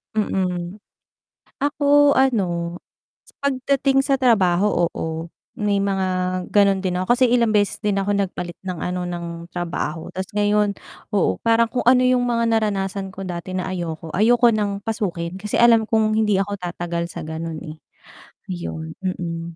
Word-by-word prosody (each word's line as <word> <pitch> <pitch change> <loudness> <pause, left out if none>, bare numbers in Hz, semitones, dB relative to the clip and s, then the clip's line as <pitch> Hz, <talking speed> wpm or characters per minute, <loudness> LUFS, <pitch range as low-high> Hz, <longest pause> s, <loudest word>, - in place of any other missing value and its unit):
Mm. 180 -3 -1 0.8
Ako 290 0 +4
ano, 180 -10 +1 0.6
pagdating 270 0 +1
sa 275 -2 +3
trabaho, 195 -6 +3
oo, 160 +1 -4 0.3
may 205 -4 0
mga 195 -1 0 0.4
ganon 200 -2 +4
din 180 -1 -1
ako 215 +7 +2
kasi 255 - +4
ilang 235 -3 +3
beses 205 -1 +1
din 205 -1 +1
ako 195 +1 0
nagpalit 180 -3 -3
ng 185 - -2
ano 180 0 -2
ng 170 -1 -6
trabaho 170 -1 -4
tapos 190 0 -3
ngayon, 205 0 +2 0.4
oo, 95 - +1
parang 230 0 +4
kung 250 - -1
ano 255 0 +6
yung 255 -1 +3
mga 235 -1 +1
naranasan 200 -3 0
ko 195 +1 -8
dati 180 +1 -5
na 185 0 -2
ayoko, 165 -3 -5
ayoko 235 +3 +5
ng 205 -2 -1
pasukin 185 -6 -3
kasi 210 +1 -3
alam 235 -1 +6
kong 220 -1 +2
hindi 210 -2 +2
ako 200 +1 -1
tatagal 175 -1 -3
sa - - -6
gano'n 160 0 -5
eh, 155 -1 -8 0.8
'yon, 80 -2 -5
mm. 170 -2 -4
195 Hz, 150 wpm, -22 LUFS, 175-225 Hz, 0.8 s, ano